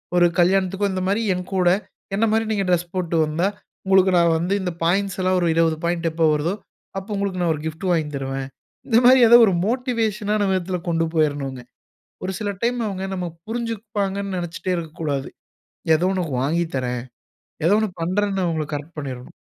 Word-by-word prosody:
ஒரு 175 0 +5
கல்யாணத்துக்கோ, 190 +2 +2
இந்த 185 - -2
மாரி 200 +4 +1
என் 180 0 -4
கூட, 180 -2 +3 0.5
என்ன 215 +3 +2
மாரி 225 +1 +2
நீங்க 205 -2 0
ட்ரெஸ் 175 -1 +1
போட்டு 175 -2 -1
வந்தா, 160 +5 0 0.4
உங்களுக்கு, 190 -1 +4
நான் 170 -1 +4
வந்து 175 +4 -1
இந்த 180 - -2
பாயிண்ட்ஸ் 195 +3 +1
எல்லாம் 185 0 +2
ஒரு 175 - +2
20 165 -1 +2
பாயிண்ட் 170 -1 0
எப்போ 160 0 +1
வருதோ? 150 +4 0 0.5
அப்போ 195 - -13
உங்களுக்கு 200 -2 -2
நான் 170 -2 +2
1 150 - -8
கிஃப்டு 160 +4 -6
வாங்கி 160 -3 +1
தருவேன்." 135 0 -3 0.4
இந்த 230 -3 +4
மாரி, 260 +1 +8
ஏதோ 235 - +10
1 195 - +2
மோட்டிவேஷனான 220 -4 0
விதத்துல 185 -1 -1
கொண்டு 165 0 +1
போயிறணுங்க. 145 -4 0 0.6
ஒரு 190 - -2
சில 205 -1 -1
டைம், 245 +1 +1
அவுங்க 190 -1 -4
நம்ம 180 -1 -3 0.2
புரிஞ்சுப்பாங்கன்னு 210 -4 -3
நெனைச்சிட்டே 175 +1 -3
இருக்கக்கூடாது. 155 -4 -3 0.7
ஏதோ 165 +3 +1
உனக்கு 175 -5 -2
வாங்கி 165 +5 +1
தரேன். 125 -1 -2 0.6
ஏதோ 190 +5 +5
ஒண்ணு 220 -1 0
பண்ணுறேன்னு 195 +2 0
அவங்கள, 160 -2 -1
கரெக்ட் 150 +3 -7
பண்ணிறணும். 130 -3 -7
180 Hz, 170 wpm, -22 LUFS, 165-200 Hz, 0.7 s, ஏதோ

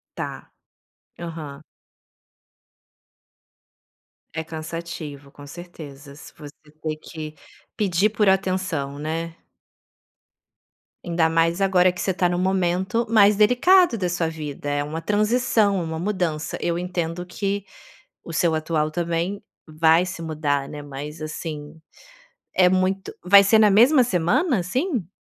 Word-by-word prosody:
Está, - - -7 0.7
aham. 155 -4 -7 2.7
É 160 - -2
cansativo, 160 -3 -7
com 145 +1 -13
certeza. 145 -4 -11
Se 175 - -13
você 145 -2 -11 0.3
ter 155 -1 -2
que 155 0 -8 0.4
pedir 200 -2 +2
por 210 -2 +3
atenção, 185 -7 -1
né. 165 +2 -4 1.7
Ainda 170 -2 +1
mais 165 +3 +1
agora 185 -2 +4
que 180 - -7
você 190 - 0
está 180 0 +1
em 175 - -1
um - - -1
momento 185 +3 0
mais 210 -2 +6
delicado 250 - +4
da 180 -2 -1
sua 175 -2 -1
vida, 150 -3 -6
é 145 0 0
uma 160 +3 -5
transição, 210 -1 +2
é - - -2
uma 160 -1 -4
mudança, 175 -4 -2
eu 170 0 -1
entendo 175 -1 -3
que 200 +2 -3 0.6
o 165 - -8
seu 165 0 +2
atual 155 -1 -1
também 170 +4 -2 0.2
vai 160 +2 +3
se 180 -1 -6
mudar, 150 -4 -1
né, 150 -1 -8
mas 145 +2 -8
assim, 155 0 -7 0.8
é 180 -1 +6
muito 185 +1 0
vai 200 +2 +7
ser 220 +3 +5
na 215 -1 +6
mesma 250 +8 +6
semana, 230 - +1
assim? 250 - -2
170 Hz, 130 wpm, -23 LUFS, 155-195 Hz, 2.7 s, vai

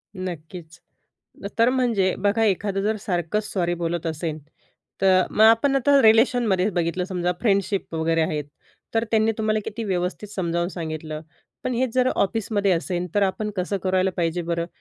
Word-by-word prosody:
नक्कीच. 175 -2 -7 0.8
तर 230 +1 +5
म्हणजे 235 -8 +1
बघा, 205 +3 +2
एखादं 200 -1 0
जर 215 +2 0
सारखंच 180 +2 -1
सॉरी 175 -3 0
बोलत 170 0 -3
असेल. 160 -1 -3 0.6
तर 185 -1 +5
मग 215 - +2
आपण 230 +5 +5
आता 280 +1 +4
रिलेशनमध्येच 220 -3 +4
बघितलं 175 +1 -1
समजा 180 -1 -1
फ्रेंडशिप 200 -4 0
वगैरे 165 0 +1
आहेत, 150 -2 -1 0.5
तर 225 0 +2
त्यांनी 220 0 +3
तुम्हाला 215 0 +1
किती 225 +2 -5
व्यवस्थित 185 +1 -2
समजावून 170 -3 -2
सांगितलं. 155 -3 -5 0.4
पण 255 - -1
हेच 245 0 0
जर 255 0 +3
ऑफिसमध्ये 205 -1 0
असेल, 175 +1 -1
तर 205 - +3
आपण 200 +2 -1
कसं 185 +2 -1
करायला 185 0 +1
पाहिजे 170 0 -1
बरं? 170 0 -2
190 Hz, 155 wpm, -23 LUFS, 175-220 Hz, 0.8 s, तर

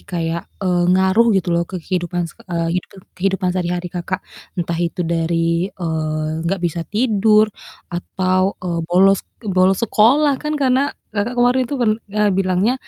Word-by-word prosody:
kayak, 170 -1 -4 0.2
eee, 180 -1 +2
ngaruh 190 +5 +4
gitu 180 -2 0
loh 170 - +2
ke 185 - -5
kehidupan 175 -1 -2
seke 165 - -11
eee, 170 -1 -1
hidupan 195 - -18 0.2
kehidupan 190 0 0
sehari-hari 180 -1 -2
Kakak. 180 +1 -3 0.4
Entah 170 -1 -2
itu 170 +1 -2
dari, 165 +1 0
eee, 155 -3 -3
nggak 195 +3 +1
bisa 170 0 -1
tidur 215 -1 +3 0.5
atau, 185 +2 0
eee, 170 -2 -1
bolos 190 +2 +4 0.2
bolos 190 -1 +3
sekolah, 270 +8 +4
kan, 300 0 -2
karena 260 -2 +2 0.3
Kakak 220 +4 -1
kemarin 245 +1 +3
itu - - -3
pern 225 -3 +3 0.2
eee, 210 +1 +1
bilangnya, 190 +4 +1
185 Hz, 155 wpm, -19 LUFS, 170-210 Hz, 0.5 s, ngaruh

